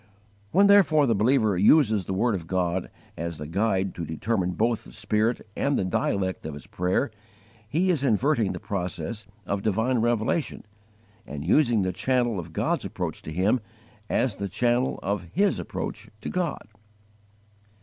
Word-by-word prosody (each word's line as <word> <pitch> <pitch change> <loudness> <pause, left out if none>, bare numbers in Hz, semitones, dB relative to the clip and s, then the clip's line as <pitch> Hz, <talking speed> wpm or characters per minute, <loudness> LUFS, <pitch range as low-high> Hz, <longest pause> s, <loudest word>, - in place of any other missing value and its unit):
When 195 - +5
therefore 185 -7 +6
the 120 - +3
believer 110 -1 +3
uses 105 - +4
the 95 - -2
word 115 +4 +2
of 85 -5 -4
God 90 0 -1 0.3
as 85 0 -4
the 75 - -6
guide 95 +3 0
to 85 - -5
determine 90 +3 -1
both 115 +5 0
the - - -13
spirit 110 +3 0
and 140 0 +1
the - - 0
dialect 95 +1 -1
of 75 - -6
his 75 - -10
prayer, 90 +8 -1 0.6
he 180 +7 +2
is 150 -6 0
inverting 120 -3 +2
the - - -6
process 100 +3 -4 0.2
of 100 0 -2
divine 110 +5 +1
revelation 120 +6 0 0.6
and 75 +1 -6
using 120 - +3
the 95 0 -1
channel 120 -1 +1
of 85 -1 -8
God's - - 0
approach - - -4
to 80 - -8
him 95 +9 +2 0.5
as 125 -7 0
the 100 - -3
channel 120 +5 +1
of 95 -3 -2
his 200 +2 +2
approach - - -5
to - - -4
God. 180 - -2
105 Hz, 160 wpm, -26 LUFS, 95-125 Hz, 0.6 s, therefore